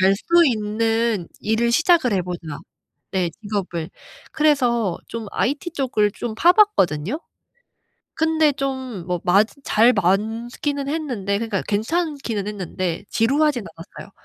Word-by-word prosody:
갈 190 +1 +5
수 340 +8 +4
있는 225 -3 0
일을 225 +2 +1
시작을 315 - +3
해 190 - +1
보자." 170 -4 -6 0.5
네. 180 -3 0
직업을. 190 -6 -3 0.4
그래서 245 - +2
좀 230 -2 -6
IT 290 +6 -1
쪽을 245 -8 +1
좀 230 -2 -5
파봤거든요. 310 - +3 1.0
근데 320 -2 +3
좀 260 -9 -4
뭐 180 -2 -2
맞 200 +4 +5 0.2
잘 235 +2 +4
많기는 225 - -1
했는데 245 -11 -2
그러니까 220 -3 -2
괜찮기는 240 - -1
했는데. 185 -4 -4
지루하진 275 +2 +2
않았어요. 190 +4 -12
225 Hz, 255 characters per minute, -22 LUFS, 195-280 Hz, 1.0 s, 갈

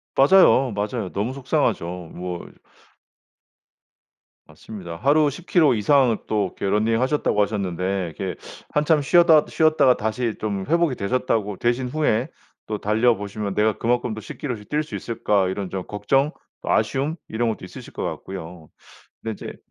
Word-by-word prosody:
맞아요. 135 -4 +6
맞아요. 105 -1 -3
너무 110 +6 -2
속상하죠. 140 - 0 0.3
뭐 90 -1 -6 2.0
맞습니다. 90 -6 -9
하루 145 - +3
10 165 +6 -9
킬로 155 -8 +4
이상 120 +1 +3
또 105 -1 +1
이렇게 - - -2
러닝 110 +3 +2
하셨다고 130 -6 +1
하셨는데 95 -3 -1
이렇게 95 -2 -4 0.3
한참 150 +1 +2
쉬었다 160 +1 +5
쉬었다가 155 -5 +3
다시 110 +1 -2
좀 100 -3 -3
회복이 170 -4 +2
되셨다고 105 -2 -1
되신 120 +2 0
후에 130 -4 0 0.4
또 105 - -2
달려 110 +4 +3
보시면 100 0 -4
'내가 105 +1 +1
그만큼 120 0 0
또 110 - -7
10 - - -9
킬로씩 120 -8 -5
뛸 150 +1 0
수 155 - -8
있을까?' 105 -4 0
이런 95 0 -3
좀 95 0 -4
걱정 135 +9 +1 0.3
또 - - -6
아쉬움 140 +4 +1
이런 115 +1 0
것도 105 -4 -5
있으실 - - -11
것 - - -4
같고요. 90 -4 -7 0.5
근데 110 - -3
이제 105 - -8
110 Hz, 325 characters per minute, -23 LUFS, 100-135 Hz, 2.0 s, 맞아요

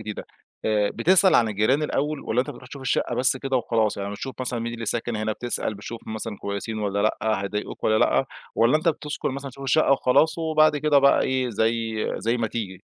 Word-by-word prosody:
جديدة، 105 -1 -7 0.4
آآ 105 -1 +1
بتسأل 190 +2 +5
عن 115 -2 +4
الجيران 110 +8 +1
الأول 150 0 -1
والّا 120 - 0
أنت 135 - -4
بتروح 125 -2 -12
تشوف 135 0 -9
الشقة 130 - 0
بس 130 +1 +2
كده 135 0 -1
وخلاص؟ 115 -3 0
يعني 100 0 -4
بتشوف 130 +6 -6
مثلًا 125 -2 -2
مين 115 0 -4
اللي 115 -1 -6
ساكن 120 +1 -1
هنا، 110 0 -1
بتسأل 120 -2 -2
بتشوف 110 +3 -8
مثلًا 110 -1 -5
كويسين 100 +2 -4
والّا 100 -1 -2
لأ، 110 -1 0
هيضايقوك 105 +1 -5
والّا 110 0 +3
لأ، - - +2 0.3
والّا 115 +6 +4
أنت 155 +2 0
بتسكن 150 -2 -2
مثلًا 140 +1 -6
تشوف 135 +2 -11
الشقة 140 +2 +3
وخلاص 155 +5 +2
وبعد 155 -2 +3
كده 145 -1 +3
بقى 140 0 +4
إيه 130 -1 0
زي 115 0 -1 0.2
زي 115 +2 0
ما 115 -2 -1
تيجي؟ 100 -5 -5
120 Hz, 210 wpm, -24 LUFS, 110-140 Hz, 0.4 s, بتسأل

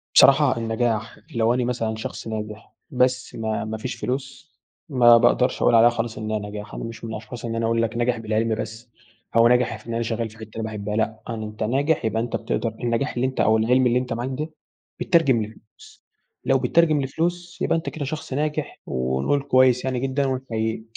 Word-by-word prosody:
بصراحة - - +6
النجاح 115 -1 -1 0.2
لو 115 +1 +3
أنا 125 0 0
مثلًا 115 -3 -1
شخص 110 - -6
ناجح 110 0 -6 0.2
بس 125 -1 +1
ما 110 -1 -2
ما 110 0 -4
فيش 125 +4 -4
فلوس، 135 +4 -5 0.4
ما 120 -4 +7
باقدرش 120 +1 +2
أقول - - +4
عليها 115 +1 +7
خالص 115 -1 -3
إنها 110 0 -2
نجاح، 105 0 -7
أنا - - -5
مش 115 0 -8
من 115 - -5
الأشخاص 110 +2 -7
إن 115 - -3
أنا 115 0 0
أقول 115 0 +1
لَك 115 +1 -1
ناجح 120 0 +1
بالعلم 110 0 0
بس، 110 +2 -7 0.5
أو 115 0 +7
ناجح 125 -2 +2
في 105 - -18
إن 115 - -4
أنا 115 0 0
شغال 115 0 -2
في 110 - -16
حتة 110 -1 -10
أنا 115 - -3
باحبها 105 -1 -4
لأ، 110 0 -1
أن 115 -2 -4
أنتَ 105 0 -5
ناجح 140 +5 +1
يبقى 110 +1 0
أنتَ 120 - -3
بتقدر 115 - -1
النجاح 120 +4 0
اللي 125 +2 +1
أنتَ 130 - -5
أو 110 +1 +4
العلم 125 +3 +3
اللي 120 +1 +3
أنتَ 125 -2 -3
معاك 120 +3 -3
ده 150 +5 -3 0.5
بيتترجم 140 -9 +3
لفلوس، 110 0 -15 0.4
لو - - +4
بيتترجم 160 -3 +3
لفلوس 175 +6 -3
يبقى - - +2
أنتَ 165 - -3
كده 150 -3 -5
شخص 145 -1 -5
ناجح، 150 +2 -2
ونقول 65 - 0
كويس 130 -1 +4
يعني 130 -2 -1
جدًا 135 +2 0
ونحَييك، 115 -4 -2
115 Hz, 205 wpm, -23 LUFS, 110-130 Hz, 0.5 s, ما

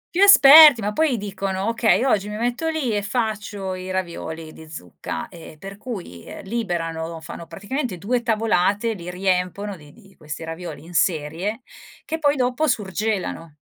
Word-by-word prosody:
Più 370 - +2
esperti, 305 -8 +9
ma 210 0 -2
poi 300 -1 +1
dicono: 195 -1 -3
"Okay 230 0 +2
oggi 210 -6 +1
mi 210 - -5
metto 240 +7 -1
lì 300 -9 -1
e 205 - 0
faccio 210 -3 -3
i 185 0 -7
ravioli 165 -3 -5
di 160 -1 -13
zucca," 90 - -7
ehm, 165 -2 -13
per 195 +4 -10
cui, 190 - -7
ehm, - - -10
liberano 170 -6 -3
fanno 165 +1 -9
praticamente 205 - -4
2 235 +7 -1
tavolate, 220 -1 +1
li 180 -3 -8
riempiono 185 +2 -1
di 150 -4 -16
di 195 -1 -20
questi 155 +1 -8
ravioli 160 -2 -7
in 175 - -12
serie 170 - -1 0.4
che 320 +1 -4
poi 290 -2 +2
dopo 255 +4 0
surgelano. 200 - -2
200 Hz, 160 wpm, -22 LUFS, 170-235 Hz, 0.4 s, esperti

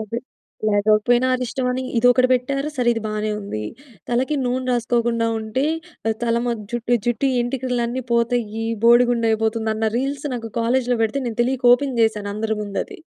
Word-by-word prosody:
Okay. 220 +2 -4 0.5
లేవలేగాపోయిన 215 +4 +3
అరిష్టమని. 250 +1 -2 0.2
ఇదొకటి 245 +1 +4
బెట్టారు, 275 +3 0
సరే 245 -1 +1
ఇది 225 - -3
బానే 215 0 -2
ఉంది. 110 - -5 0.5
తలకి 260 +5 0
నూనె 255 +1 -1
రాసుకోకుండా 235 -1 +1
ఉంటే, 220 +6 -2 0.4
ఆహ్, 220 - 0
తల 230 -1 +1
మొ 240 - 0 0.2
జుట్టు 240 0 +1
జుట్టు 240 +3 +1
ఏంటికలన్నీ 245 0 -2
పోతాయి. 235 -2 0 0.2
బోడిగుండు 240 -1 +5
అయిపోతుంది. 220 0 0
అన్న 220 0 0
రీల్స్ 275 +3 -2
నాకు 230 -2 -5
కాలేజ్‌లో 245 +1 +1
బెడితే 225 +5 0
నేను 230 0 -5
తెలియక 255 0 0
ఓపెన్ 265 -1 -3
జేశాను 215 -2 +1
అందరి 220 0 -2
ముందది. 210 - -5
240 Hz, 150 wpm, -21 LUFS, 225-250 Hz, 0.5 s, బోడిగుండు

